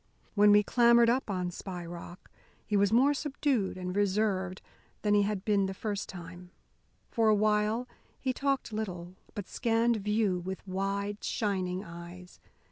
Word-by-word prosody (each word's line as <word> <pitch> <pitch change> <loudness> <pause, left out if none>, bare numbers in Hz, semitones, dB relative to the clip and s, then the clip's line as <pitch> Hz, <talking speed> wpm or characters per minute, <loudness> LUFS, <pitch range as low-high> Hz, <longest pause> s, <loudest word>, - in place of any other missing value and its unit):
When 205 0 +6
we 205 0 +6
clambered 235 +1 +5
up 255 -1 -1
on 180 -2 -2
Spy 180 -1 -6
Rock, 175 +1 -10 0.3
he 210 - -1
was 200 0 +3
more 265 +6 +5
subdued 275 -8 -1
and 180 0 -4
reserved 195 -2 0 0.4
than 210 -1 +3
he 205 - +5
had 200 -1 -1
been 200 -2 +2
the 190 - -5
first 205 0 -3
time. 180 0 -9 0.6
For 225 -1 +3
a 215 - +5
while 215 +3 +1 0.3
he 260 -1 -1
talked 275 -3 -1
little, 180 -5 -4 0.2
but 205 -2 -5
scanned 230 -1 +1
view 210 -2 +1
with 190 +2 -6
wide, 200 +2 -2
shining 190 -3 -1
eyes. 175 +1 -11
205 Hz, 155 wpm, -30 LUFS, 185-220 Hz, 0.6 s, When